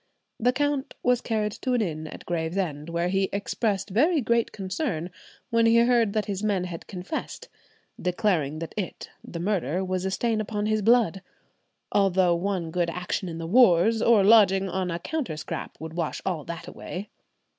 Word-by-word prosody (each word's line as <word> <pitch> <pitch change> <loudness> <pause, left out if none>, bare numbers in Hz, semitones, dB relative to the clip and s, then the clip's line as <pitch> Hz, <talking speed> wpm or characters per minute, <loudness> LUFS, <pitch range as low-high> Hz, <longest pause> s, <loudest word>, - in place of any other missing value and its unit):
The 245 +2 +3
count 285 0 -1
was 250 0 +3
carried 215 -2 -1
to 255 +5 -3
an 240 - +2
inn 155 -4 -4
in - - -9
Gravesend, 165 -2 -2
where 170 +1 0
he 195 0 +1
expressed 200 0 -1
very 305 - +3
great 235 -2 +1
concern 190 - -3 0.4
when 230 0 +4
he 230 +1 +5
heard 235 -3 +4
that 215 -1 0
his 200 -2 -3
men 205 -4 +1
had 175 -2 -7
confessed; 185 - -6 0.5
declaring 175 -5 0
that 165 0 -6
it 200 -4 -5
(the 170 - -7
murder) 180 -2 -1
was 185 0 -2
a 190 - 0
stain 220 +3 0
upon 210 0 -3
his 215 0 +1
blood, 215 -4 +3 0.7
"although 190 -3 +3
one 175 -1 -2
good 175 0 0
action 180 +2 -3
in 165 - -6
the 165 - -5
wars, 220 +1 +5
or 230 -4 +5
lodging 195 -2 +6
on 185 0 -2
a 170 - -2
counterscrap, 175 - -5
would 160 0 -7
wash 165 -2 -2
all 175 -6 -1
that 170 -1 -7
away." 195 +4 -7
195 Hz, 175 wpm, -26 LUFS, 175-225 Hz, 0.7 s, lodging